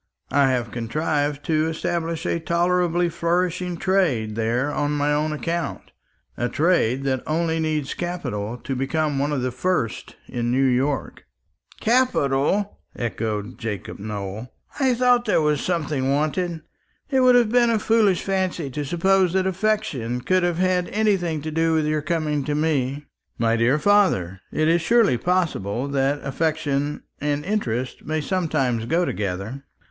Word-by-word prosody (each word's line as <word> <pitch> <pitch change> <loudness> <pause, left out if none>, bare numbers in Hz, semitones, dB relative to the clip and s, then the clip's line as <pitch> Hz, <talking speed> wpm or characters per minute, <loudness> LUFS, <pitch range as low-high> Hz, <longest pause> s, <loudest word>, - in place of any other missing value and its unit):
I 140 -1 +4
have 120 -3 -1
contrived 145 +5 -1
to 155 -1 +1
establish 165 +1 -2
a 170 - 0
tolerably 175 +1 +1
flourishing 175 +1 -1
trade 165 - +1
there 120 +6 0
on 145 +1 0
my 145 0 +1
own 150 +1 0
account; 165 +2 -3 0.4
a 120 - -1
trade 145 -6 +2
that 130 -2 0
only 165 +1 0
needs 155 -3 -1
capital 125 -11 -4
to 135 +2 -4
become 145 +2 0
one 145 +2 0
of 135 -4 -1
the 130 - -1
first 125 -4 -2
in 120 -1 -2
New 130 +2 +2
York." 130 +2 0 0.5
"Capital!" 205 - +1 0.2
echoed 110 0 -3
Jacob 105 -6 -5
Nowell; 105 +2 -5 0.3
"I 260 -3 +3
thought 245 0 +3
there 210 - +3
was 150 -2 +1
something 150 -6 -1
wanted. 155 +4 0 0.5
It 265 - +3
would 255 -1 +6
have 235 -3 +4
been 240 -1 +4
a 230 - +3
foolish 215 -4 +2
fancy 185 -6 -1
to 145 +3 -3
suppose 180 +4 +2
that 190 0 +2
affection 190 - -1
could 185 +9 +2
have 175 -1 0
had 180 -1 +1
anything 190 -8 0
to 155 - -4
do 165 +1 +1
with 155 -1 +1
your 155 0 0
coming 150 -2 -1
to 145 - -1
me." 145 -2 0 0.3
"My 115 0 +2
dear 120 +5 +3
father, 150 - +2
it 155 - +1
is 170 +1 +3
surely 220 - +3
possible 140 - 0
that 140 +1 0
affection 145 0 -1 0.2
and 145 0 -1
interest 130 - -2
may 155 +1 -1
sometimes 140 -9 0
go 170 +5 +2
together. 100 - -4
155 Hz, 150 wpm, -23 LUFS, 130-180 Hz, 0.5 s, would